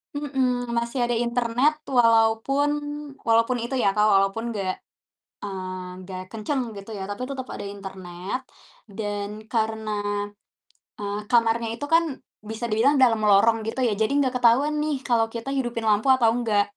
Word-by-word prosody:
Mhm, 255 -4 -1
masih 235 +3 -2
ada 240 - 0
internet 240 +4 +2 0.2
walaupun 230 +5 +4 0.6
walaupun 230 +2 +3
itu 245 +3 -3
ya, - - +3
Kak, 210 0 +4
walaupun 195 +3 +2
gak 190 -2 -1 0.7
mmm, 185 -2 -6
gak 185 -1 -6
kenceng 230 +5 -2 0.2
gitu 200 +2 -10
ya, 195 - -6
tapi 205 +4 -5
tetep 260 -2 -5
ada - - -6
internet 190 +1 -6 0.6
dan 205 -2 -3 0.2
karena, 220 -1 -1 1.1
eee, 205 0 -3
kamarnya 230 -1 +3
itu 270 +5 -5
kan 335 +1 +6 0.5
bisa 220 +2 -4
dibilang 230 +7 +3
dalam 230 -4 +5
lorong 225 +3 +5
gitu 225 +4 -4
ya, 220 - +1
jadi 220 - +2
gak 255 -1 -1
ketahuan 250 +5 +4
nih 305 -1 0
kalau 235 -3 +3
kita 230 +3 -5
hidupin 240 -3 -2
lampu 210 +2 +2
atau 235 -3 +3
enggak. 215 -4 +2
230 Hz, 150 wpm, -24 LUFS, 205-245 Hz, 1.1 s, kan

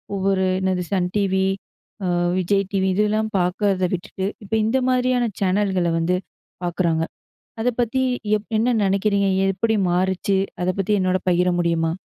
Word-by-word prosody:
ஒவ்வொரு 190 -1 +1
என்னது 185 -1 0
Sun 180 -2 +1
TV, 190 -2 +1 0.6
அ - - 0 0.3
Vijay 195 +2 +1
TV 190 -1 +1
இதெல்லாம் 215 +2 +1
பாக்கறத 185 +1 +1
விட்டுட்டு, 190 +1 -3 0.2
இப்ப 200 - -9
இந்த 255 +4 +2
மாதிரியான 250 -1 +2
சேனல்கள 190 -2 +1
வந்து 175 +2 +1 0.5
பாக்குறாங்க. 170 -2 0 0.6
அத 235 - +1
பத்தி 240 +3 +1 0.4
எப் 210 - -16
என்ன 245 +2 +2
நெனைக்கிறீங்க? 200 +1 +2 0.2
எப்டி 220 +3 +1
மாறுச்சு? 190 +2 +1 0.2
அத 180 - 0
பத்தி 195 +2 0
என்னோட 185 0 +1
பகிர 180 +1 +2
முடியுமா? 165 -1 +1
190 Hz, 140 wpm, -22 LUFS, 180-210 Hz, 0.6 s, இந்த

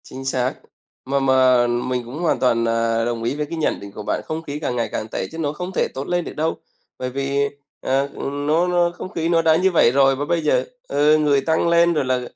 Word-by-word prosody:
Chính 135 +1 -9
xác. 130 -1 0 0.5
Mà 140 +1 0
mà 130 -2 +4
mình 120 +1 -1
cũng 130 +6 -8
hoàn 170 - +1
toàn, 115 -2 +2
à, 115 0 +1
đồng 115 -1 -3
ý 120 - -1
với 150 0 -2
cái 165 +3 -6
nhận 160 - 0
định 100 0 -10
của 105 - -8
bạn, - - -1
không 155 +1 -4
khí 145 -1 -5
càng 135 -5 -2
ngày 120 -1 -1
càng 110 - -3
tệ - - -4
chứ 160 - -8
nó 150 -3 -2
không 180 +4 -5
thể - - +2
tốt 135 +1 -5
lên 175 -1 0
được - - -6
đâu. 160 +2 -1 0.4
Bởi 130 - -3
vì, 140 +2 0 0.3
ờ, 135 +1 +1
ừm, 145 +1 -4
nó 165 +4 +2
nó 175 -1 +2
không - - -6
khí 165 -2 -2
nó 165 -1 +3
đã 160 -1 +4
như 185 +3 +2
vậy 160 -8 +4
rồi 135 0 +4
và 145 +2 -3
bây 170 +2 0
giờ, - - +2 0.2
ừ, 150 +1 +3
người 145 -2 +2
tăng 160 +2 +1
lên 170 0 +4
rồi 150 -4 0
là, 130 -1 0
140 Hz, 255 wpm, -21 LUFS, 125-160 Hz, 0.5 s, mà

